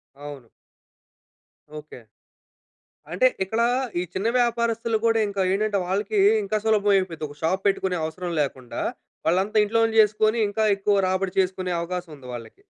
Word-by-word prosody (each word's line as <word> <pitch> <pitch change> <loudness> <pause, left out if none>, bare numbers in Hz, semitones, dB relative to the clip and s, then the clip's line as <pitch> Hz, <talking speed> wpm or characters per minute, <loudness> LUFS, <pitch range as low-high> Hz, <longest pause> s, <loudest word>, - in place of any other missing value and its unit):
అవును. 140 -4 -10 1.3
ఓకె. 150 -4 -11 1.1
అంటే - - +3 0.2
ఇక్కడ 220 +4 -2 0.4
ఈ - - -1
చిన్న 195 +4 -1
వ్యాపారస్తులు 235 -1 0
కూడా 225 0 +3
ఇంకా 200 -1 -2
ఏంటంటే, 205 +1 0
వాళ్ళకి 205 - -1 0.3
ఇంకా 215 - -1
సులభం 210 -2 +3
అయిపోయిద్ది. 170 -5 -2
ఒక 145 - -13
షాప్ 185 +4 0
పెట్టుకునే 190 -2 +1
అవసరం 175 +2 -5
లేకుండా, 130 -4 -4 0.5
వాళ్ళంతా 190 +6 +2
ఇంట్లోనే 225 +1 +1
చేసుకొని 215 +2 +2
ఇంకా 220 +2 -1
ఎక్కువ 200 +1 +1
రాబడి 190 0 -1
చేసుకునే 185 -1 -1
అవకాశం 175 0 -5
ఉంది 130 -3 -13
వాళ్ళకి. 120 - -10
195 Hz, 135 wpm, -24 LUFS, 170-220 Hz, 1.3 s, అంటే